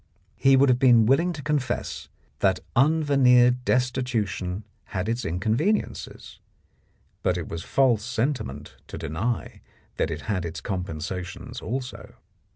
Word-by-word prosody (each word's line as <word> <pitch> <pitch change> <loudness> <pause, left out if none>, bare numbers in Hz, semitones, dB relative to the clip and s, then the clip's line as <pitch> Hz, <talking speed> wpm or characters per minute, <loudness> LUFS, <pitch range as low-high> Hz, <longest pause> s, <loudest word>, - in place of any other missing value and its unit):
He 135 0 +4
would 135 +1 +5
have 125 -1 +3
been 120 -4 +6
willing 160 +9 +3
to 150 -4 -7
confess 145 -3 -2 0.3
that 95 -2 +2 0.2
un 155 +5 +4
veneered 125 -3 +4
destitution 120 -7 -1 0.2
had 95 0 -4
its 115 +2 -1
inconveniences, 110 - -2 0.8
but 90 -1 +1
it 85 - -4
was 80 - -5
false 120 0 +2
sentiment 110 - -3
to - - -7
deny 105 +11 -3 0.4
that - - 0
it 80 -1 -4
had 100 -5 -2
its 85 -1 -5
compensations 90 -1 -5
also. 130 +2 -5
120 Hz, 130 wpm, -25 LUFS, 90-130 Hz, 0.8 s, been